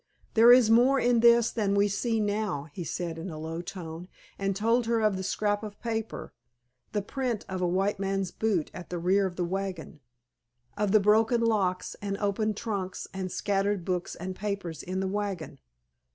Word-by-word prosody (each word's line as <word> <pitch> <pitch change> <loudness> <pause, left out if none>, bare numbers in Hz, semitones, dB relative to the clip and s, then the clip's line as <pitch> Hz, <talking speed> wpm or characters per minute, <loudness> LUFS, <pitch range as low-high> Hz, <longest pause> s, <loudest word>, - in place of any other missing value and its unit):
"There 235 +1 +8
is 245 -3 +7
more 255 +4 +5
in 240 -1 +3
this 235 0 +5
than 205 -3 0
we 200 0 +4
see 225 +3 0
now," 205 -7 -1
he 175 - -5
said 170 -1 -4
in 180 +4 -5
a 155 - -7
low 160 +2 -4
tone, 175 -2 -7 0.3
and 195 -1 0
told 230 +3 +2
her 230 -1 +2
of 215 -2 +2
the 190 - -3
scrap 205 +2 0
of 210 -2 -8
paper, 225 -2 -4 0.6
the 205 -2 -1
print 245 -1 -3
of 185 -1 -4
a 180 - +2
white 190 +3 0
man's 195 -2 -1
boot 200 -8 -1
at 175 - -9
the 180 - -3
rear 190 +3 +2
of 180 - -8
the 175 - -1
wagon, 185 -4 -4 0.8
of 205 -1 0
the 215 - +6
broken 220 +3 +3
locks 200 -5 0
and 200 -1 -3
opened 210 +1 -1
trunks 200 -5 -4
and 190 -1 -4
scattered 200 -2 0
books 180 -2 -2
and 185 +2 -6
papers 195 -5 -4
in 185 +1 -3
the 190 - -1
wagon. 195 -4 -4
200 Hz, 190 wpm, -28 LUFS, 185-220 Hz, 0.8 s, There